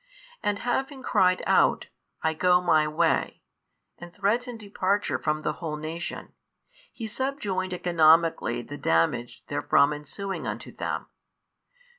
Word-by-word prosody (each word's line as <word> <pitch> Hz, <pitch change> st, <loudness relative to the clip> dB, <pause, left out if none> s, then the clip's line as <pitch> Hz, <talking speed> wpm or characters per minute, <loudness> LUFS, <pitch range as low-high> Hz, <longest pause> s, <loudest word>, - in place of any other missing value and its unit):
And 205 Hz, -1 st, 0 dB
having 265 Hz, +4 st, -2 dB
cried 185 Hz, -4 st, +3 dB
out, -, -, +3 dB, 0.4 s
I 160 Hz, 0 st, +2 dB
go 180 Hz, +2 st, +4 dB
My 160 Hz, -4 st, +3 dB
way, 160 Hz, +2 st, 0 dB, 0.6 s
and 175 Hz, 0 st, -10 dB
threatened 225 Hz, +5 st, -1 dB
departure 200 Hz, -1 st, -1 dB
from 155 Hz, 0 st, -1 dB
the 150 Hz, -, -1 dB
whole 160 Hz, -3 st, -3 dB
nation, 160 Hz, +2 st, -6 dB, 0.6 s
He 230 Hz, -, -7 dB
subjoined 215 Hz, -6 st, -2 dB
economically 165 Hz, -8 st, +3 dB
the 145 Hz, +2 st, -9 dB
damage 85 Hz, +9 st, 0 dB
therefrom 145 Hz, 0 st, +2 dB
ensuing 190 Hz, +7 st, -5 dB
unto -, -, -5 dB
them. -, -, -3 dB
175 Hz, 120 wpm, -26 LUFS, 155-205 Hz, 0.6 s, go